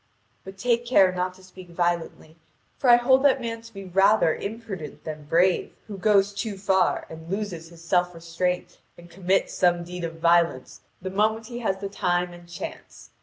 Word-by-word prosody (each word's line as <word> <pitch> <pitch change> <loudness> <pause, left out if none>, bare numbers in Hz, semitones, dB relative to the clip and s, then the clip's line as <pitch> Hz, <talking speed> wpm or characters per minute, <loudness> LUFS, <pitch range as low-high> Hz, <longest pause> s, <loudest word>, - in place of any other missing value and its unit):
But 190 0 -10
take 235 +3 +1
care 195 -7 +5
not 180 0 -2
to 190 - -18
speak 185 -1 -13
violently, 170 -2 -2 0.4
for 260 - +2
I 240 - +10
hold 260 +2 +4
that 275 -2 +4
man 230 -2 -4
to 230 0 -14
be 195 -3 -9
rather 195 -1 +4
imprudent 200 -8 -7
than 155 -1 -7
brave 175 +4 +2
who 200 -3 -8
goes 200 0 +3
too 205 0 -4
far 190 -1 +1
and 160 +1 -11
loses 185 -5 -4
his 170 -1 -15
self 180 0 +1
restraint 170 +2 -3 0.2
and 175 0 -15
commits 190 +1 0
some 175 -1 +2
deed 175 0 -7
of 165 -1 -4
violence 170 -5 +2 0.2
the 185 - -4
moment 220 +3 +1
he 240 +1 -7
has 195 -5 -1
the 200 - -2
time 180 -2 -1
and 175 0 -14
chance. 175 - -9
185 Hz, 185 wpm, -25 LUFS, 175-210 Hz, 0.4 s, I